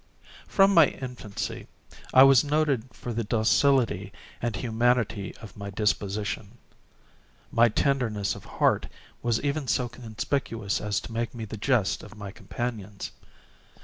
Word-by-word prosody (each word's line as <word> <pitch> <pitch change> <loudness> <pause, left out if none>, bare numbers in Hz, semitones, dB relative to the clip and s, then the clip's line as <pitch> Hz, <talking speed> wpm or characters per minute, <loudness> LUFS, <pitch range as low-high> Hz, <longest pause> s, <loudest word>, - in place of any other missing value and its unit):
From 195 0 +4
my 165 -5 +8
infancy 125 -6 -6 0.4
I 130 - +9
was 135 -3 +7
noted 145 -5 0
for 120 - -6
the 115 +1 -1
docility 110 -2 +2 0.3
and 120 -3 -1
humanity 115 -2 0
of 105 - -10
my 100 -1 -6
disposition. 105 +1 -2 0.9
My 115 +1 +5
tenderness 110 -5 0
of - - -10
heart - - +1 0.3
was 120 -2 +1
even 140 0 -1
so 125 +1 +1
conspicuous 115 -2 -3
as 105 -1 0
to 110 - -9
make 115 +1 -3
me 115 -2 -5
the 110 - -7
jest 110 -2 +1
of 105 - -12
my 100 -2 -7
companions. 105 -3 -5
115 Hz, 135 wpm, -27 LUFS, 105-130 Hz, 0.9 s, I